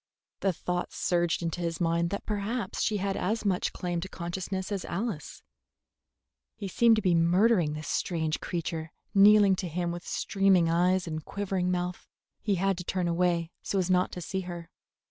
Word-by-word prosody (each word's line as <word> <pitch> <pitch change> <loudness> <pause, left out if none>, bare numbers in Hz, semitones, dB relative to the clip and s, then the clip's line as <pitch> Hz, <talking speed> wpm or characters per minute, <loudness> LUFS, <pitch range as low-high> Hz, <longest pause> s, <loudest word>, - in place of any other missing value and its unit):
The 195 - +2
thought 180 +1 -3
surged 175 -1 0
into 170 +1 -2
his 165 -1 -2
mind 170 0 +1
that 200 - -4
perhaps 215 +4 -2
she 215 - +1
had 195 0 -1
as 220 +3 -1
much 185 -3 +1
claim 175 -1 -3
to 190 - -6
consciousness 185 +3 -4
as 195 -3 -2
Alice; 195 - -4 1.1
he 200 - -5
seemed 230 +4 +4
to 215 - -1
be 180 -3 +3
murdering 175 0 +3
this 155 0 -6
strange 160 -3 -1
creature 165 -2 -4 0.2
kneeling 205 -1 +7
to 185 - -3
him 170 +1 -2
with 175 0 -5
streaming 195 -4 +2
eyes 180 +2 +2
and 155 -2 -4
quivering 190 -1 -2
mouth. 180 0 -2 0.3
He 205 -2 +1
had 195 0 0
to - - -4
turn 180 0 -1
away 170 -1 +1
so 200 - -2
as 185 -1 +1
not 180 0 +3
to 180 - -5
see 190 +3 -3
her. 175 -2 -8
180 Hz, 180 wpm, -28 LUFS, 170-195 Hz, 1.1 s, kneeling